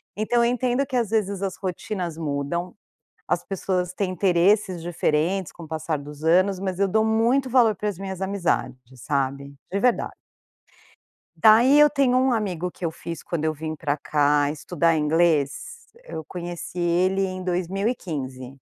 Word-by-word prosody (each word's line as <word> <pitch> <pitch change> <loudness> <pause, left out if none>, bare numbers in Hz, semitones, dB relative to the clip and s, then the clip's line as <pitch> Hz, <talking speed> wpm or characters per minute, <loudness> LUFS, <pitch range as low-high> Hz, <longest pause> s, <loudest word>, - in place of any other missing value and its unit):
Então 220 +3 +1
eu - - +4
entendo 250 +2 0
que 260 -2 -5
às 230 -4 +1
vezes 200 -3 -1
as 195 -2 -3
rotinas 180 -2 -4
mudam, 155 +3 -3 0.5
as - - 0
pessoas 185 -2 -2
têm 190 -1 -2
interesses 185 0 +2
diferentes 170 +2 0
com 170 - -12
o - - -10
passar 160 0 -2
dos 145 +1 -10
anos, 185 +3 +3
mas 190 -2 -3
eu 200 - +3
dou 220 +3 +2
muito 235 +4 +2
valor 235 -4 +4
para 210 - -2
as 200 - -6
minhas 190 -1 -6
amizades, 190 -9 -1 0.2
sabe 140 +2 -2 0.2
de 200 - 0
verdade. 250 +2 +1 1.2
Daí 235 +6 +6
eu 295 0 +8
tenho 270 -3 +2
um 260 0 +3
amigo 180 -6 -2
que 175 - -10
eu 165 - 0
fiz 165 0 -7
quando 165 -3 -3
eu 155 0 0
vim 155 +1 -5
para 145 -2 -1
cá 145 -1 +2
estudar 165 +2 0
inglês, 155 -2 +3 0.5
eu 160 - -7
conheci 175 +1 -7
ele 180 +3 +2
em 185 0 -4
2015. 175 - -3
180 Hz, 165 wpm, -24 LUFS, 155-205 Hz, 1.2 s, eu